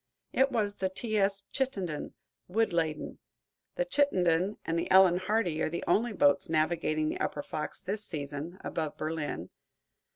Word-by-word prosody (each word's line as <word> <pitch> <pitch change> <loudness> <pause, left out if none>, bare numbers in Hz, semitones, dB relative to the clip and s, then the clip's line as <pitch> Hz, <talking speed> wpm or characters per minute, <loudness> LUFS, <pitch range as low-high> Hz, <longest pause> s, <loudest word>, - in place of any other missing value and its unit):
It 270 +1 +3
was 210 -4 0
the 190 - 0
"T. 215 +4 -4
S. 195 0 +1
Chittenden," 195 - -2 0.3
wood 220 +1 +1
laden. 160 -2 -1 0.6
The - - 0
"Chittenden" 190 - +2
and 165 +1 0
the - - -3
"Ellen 185 -2 +7
Hardy" 185 -4 0
are - - +1
the 170 +2 -4
only 225 +6 +2
boats 145 -8 +3
navigating 155 -1 +1
the - - -3
upper 145 - -2
Fox 155 - -5
this 205 +4 -3
season, 150 +1 -5
above 155 -3 -3
Berlin. 155 - -3
180 Hz, 155 wpm, -30 LUFS, 155-210 Hz, 0.6 s, Ellen